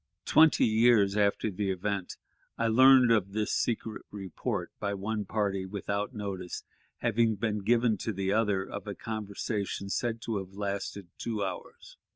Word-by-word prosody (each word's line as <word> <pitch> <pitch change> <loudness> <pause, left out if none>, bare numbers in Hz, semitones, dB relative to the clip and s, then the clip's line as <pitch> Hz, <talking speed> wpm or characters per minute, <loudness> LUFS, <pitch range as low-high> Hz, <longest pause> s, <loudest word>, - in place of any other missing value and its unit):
Twenty 160 0 +5
years 110 -3 +4
after 105 +1 +1
the 100 +1 -2
event, 95 0 -3 0.4
I 115 - +1
learned 130 +1 +7
of 100 -4 +2
this 105 0 -1
secret 110 -1 -1
report, 95 -4 -4
by 100 0 -2
one 105 +2 -3
party, 100 -2 -1
without 100 +3 -3
notice 100 -6 -5 0.4
having 115 -1 +2
been 105 0 -1
given 115 +1 +2
to 110 - -3
the 95 -1 -1
other, 105 -3 +2
of 100 +1 -7
a 100 - -4
conversation 105 -2 -4
said 115 +2 -1
to 110 -3 -2
have 95 0 -9
lasted 100 -1 -4
two 110 -3 -2
hours. 95 -2 -7
105 Hz, 155 wpm, -29 LUFS, 100-110 Hz, 0.4 s, learned